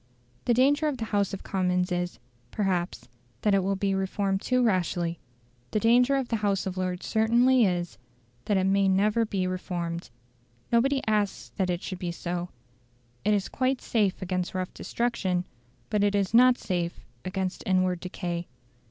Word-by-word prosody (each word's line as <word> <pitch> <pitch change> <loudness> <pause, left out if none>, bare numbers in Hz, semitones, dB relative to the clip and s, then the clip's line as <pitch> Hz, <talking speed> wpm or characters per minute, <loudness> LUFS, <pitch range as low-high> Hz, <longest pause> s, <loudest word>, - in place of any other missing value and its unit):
The 240 - +3
danger 285 +5 +3
of 290 -3 -1
the 225 - -3
House 205 -3 0
of 195 - -6
Commons 180 -1 0
is, 175 0 -2 0.3
perhaps, 185 - -1 0.4
that 210 - +3
it 195 - +4
will 195 +1 0
be 195 0 0
reformed 195 0 -1
too 255 0 +2
rashly; 175 -5 0 0.5
the 215 - 0
danger 245 +5 +4
of 265 -3 -1
the 230 - +1
House 200 -2 0
of 190 -1 -3
Lords 185 -1 -3
certainly 235 +3 +4
is, 175 -1 -3 0.5
that 205 - +2
it 190 - +2
may 195 +1 +3
never 210 +4 +3
be 195 -3 -1
reformed. 175 -2 -3 0.6
Nobody 265 +4 +3
asks 210 -2 0
that 190 -2 +1
it 175 0 -2
should 185 - -5
be 175 -1 -3
so; 175 +1 -4 0.7
it 210 +1 +3
is 200 -1 -1
quite 260 0 0
safe 205 -4 0
against 185 0 -2
rough 185 -1 -3
destruction, 190 -7 -1 0.5
but 210 -1 +2
it 205 0 +2
is 200 0 0
not 250 +1 +7
safe 175 -2 -3 0.2
against 185 0 -3
inward 185 -1 +2
decay. 175 -1 -4
195 Hz, 170 wpm, -27 LUFS, 180-225 Hz, 0.7 s, not